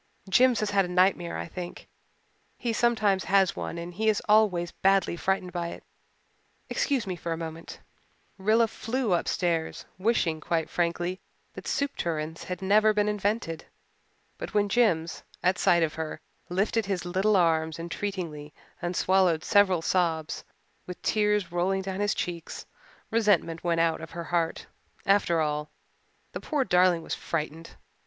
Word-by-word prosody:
"Jims 240 +4 +4
has 210 -1 -1
had 200 -1 +4
a - - -3
nightmare, 180 -1 +2
I - - -4
think. 175 +1 -8 0.7
He 235 -2 -2
sometimes 215 -5 +2
has 195 -1 +3
one - - -5
and 170 +1 -6
he 220 +4 +1
is 210 - +2
always 205 -5 +3
badly 195 -2 +2
frightened 185 +1 -1
by 175 -1 -2
it. - - -8 0.9
Excuse 275 -5 0
me 185 -2 -3
for 170 0 -5
a 165 - -1
moment." 165 0 -7 0.6
Rilla 220 +4 +3
flew 225 -1 -2
upstairs, 170 -1 -1
wishing 185 -7 +1
quite 165 -1 -1
frankly 175 +1 -1 0.3
that - - -9
soup 280 0 -1
tureens 160 -1 -3
had 180 0 -5
never 215 +2 +4
been 210 0 +2
invented. 205 -5 -1 0.7
But - - -6
when 205 -1 +3
Jims, 175 -8 +1 0.2
at 185 +1 +2
sight 170 -1 +4
of 155 - 0
her, 160 -1 -5 0.3
lifted 200 +4 0
his 185 -3 -2
little 190 +4 +2
arms 160 -3 +2
entreatingly 165 -3 -5 0.3
and 175 +1 -2
swallowed 180 -4 +3
several 190 -4 +3
sobs, 165 -4 0 0.4
with 180 - -7
tears 210 -4 +1
rolling 190 +2 0
down 190 0 -4
his 205 -1 +1
cheeks, 170 -2 -5 0.5
resentment 205 -7 +2
went 170 -1 +2
out 165 -1 +1
of 160 - -8
her 170 0 -6
heart. 165 -1 0 0.4
After 195 -4 +3
all, 150 0 -1 0.6
the - - -6
poor 295 -4 0
darling 180 -5 +3
was - - -4
frightened. 160 0 -4
180 Hz, 155 wpm, -27 LUFS, 165-205 Hz, 0.9 s, Jims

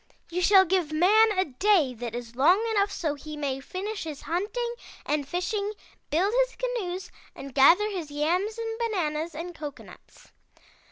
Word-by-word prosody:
You 360 +2 -1
shall 380 +1 +6
give 350 -3 0
man 415 +8 +5
a 375 - +3
day 310 -1 +2
that 235 -1 -6
is 240 -1 -7
long 320 +10 +5
enough 405 -1 +2
so 315 -6 -2
he 300 +1 -8
may 275 -2 -2
finish 395 +8 -5
his 305 -3 -7
hunting 455 +8 -2 0.3
and 290 -2 -1
fishing, 400 +5 -2 0.4
build 370 +8 +1
his - - -18
canoes 385 -8 -3 0.2
and 275 -1 -9
gather 335 +10 +6
his 365 -7 -5
yams 350 +9 0
and 450 0 -4
bananas 340 -8 -2
and 345 +3 -6
cocoanuts.' 295 -4 -11
355 Hz, 160 wpm, -27 LUFS, 300-415 Hz, 0.4 s, shall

